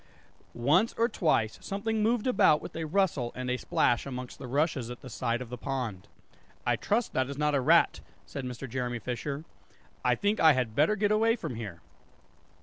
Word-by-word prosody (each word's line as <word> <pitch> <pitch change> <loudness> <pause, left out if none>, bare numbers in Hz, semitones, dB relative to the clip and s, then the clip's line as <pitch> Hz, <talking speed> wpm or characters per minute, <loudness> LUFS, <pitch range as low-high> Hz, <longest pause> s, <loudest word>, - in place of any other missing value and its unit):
Once 150 - +3
or 230 - +3
twice 155 - +1
something 215 +2 -2
moved 225 +1 +1
about 245 -11 +4
with - - -9
a 165 -1 -3
rustle 155 -9 +1
and 125 0 -3
a 125 - 0
splash 120 +3 +1
amongst 125 -2 -6
the - - -7
rushes 140 -2 0
at 125 - -8
the 130 - -10
side 120 +3 -1
of 120 - -13
the 125 - -6
pond. 125 -9 -4 0.6
"I - - +3
trust 225 +3 -1
that 130 0 0
is 140 - -6
not 150 0 +1
a 140 - +2
rat," 165 +6 +4 0.3
said 140 - -6
Mr. 125 +1 -6
Jeremy 125 0 -2
Fisher; 140 +6 -4 0.6
"I - - +3
think 205 +2 0
I 160 -1 +7
had 125 -4 -1
better 155 +9 +4
get 205 0 +1
away 225 +2 +3
from 160 - -5
here." 100 -7 -7
140 Hz, 195 wpm, -29 LUFS, 125-190 Hz, 0.6 s, I